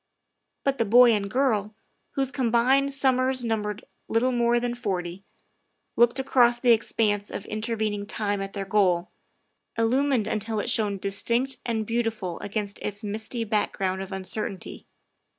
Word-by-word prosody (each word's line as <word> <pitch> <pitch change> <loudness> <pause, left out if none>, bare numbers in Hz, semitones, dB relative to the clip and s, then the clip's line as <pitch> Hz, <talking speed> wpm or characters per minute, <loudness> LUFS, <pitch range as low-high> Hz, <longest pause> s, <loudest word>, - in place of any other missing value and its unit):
But 275 -1 0
the 230 - +2
boy 240 +3 +7
and 205 -2 0
girl, 215 -4 0 0.4
whose 270 -1 0
combined 260 +2 +2
summers 260 -2 +2
num 225 -2 0
bered 210 0 -5 0.2
little 245 +3 +1
more 240 -1 +2
than 240 0 -2
forty, 190 -6 -4 0.7
looked 240 +2 +4
across 245 -3 +3
the 245 -1 +4
expanse 215 -2 +1
of 200 - -6
intervening 215 -2 -2
time 205 -2 -1
at 195 0 -6
their 195 -1 -4
goal, 185 -3 +1 0.7
illumined 250 +1 +2
until 215 0 -2
it 230 - 0
shone 210 -4 +1
distinct 235 +7 -1
and 220 -2 -1
beautiful 225 -6 -2
against 205 0 -4
its 205 +1 -5
misty 220 +3 -3
back 215 -1 0
ground 190 0 -1
of 195 +1 -7
uncertainty. 190 0 -5
220 Hz, 150 wpm, -26 LUFS, 205-240 Hz, 0.7 s, boy